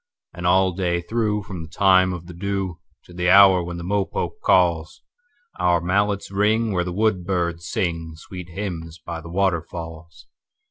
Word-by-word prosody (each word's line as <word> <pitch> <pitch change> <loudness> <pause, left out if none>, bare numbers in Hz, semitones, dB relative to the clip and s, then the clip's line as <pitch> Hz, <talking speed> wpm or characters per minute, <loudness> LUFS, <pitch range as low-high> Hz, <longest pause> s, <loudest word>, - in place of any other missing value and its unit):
And 90 0 -3
all 95 +1 +4
day 85 -1 -1
through, 105 +1 -1
from 95 -4 -7
the 80 - -9
time 95 +1 +4
of 90 -2 -6
the 90 - -10
dewTo 95 -1 -3 0.3
the 90 0 0
hour 95 -2 +7
when 85 0 -6
the 85 - -6
mopoke 100 +2 -2
calls, 85 -3 +2 0.6
Our 85 -1 +3
mallets 100 +3 0
ring 110 +3 +2
where 90 -2 0
the 90 - -4
woodbirds 90 -4 -1
singSweet 85 +1 -4
hymns 85 -4 -6
by 85 -1 -7
the 85 - -10
waterfalls. 85 -3 -3
90 Hz, 150 wpm, -22 LUFS, 85-100 Hz, 0.6 s, hour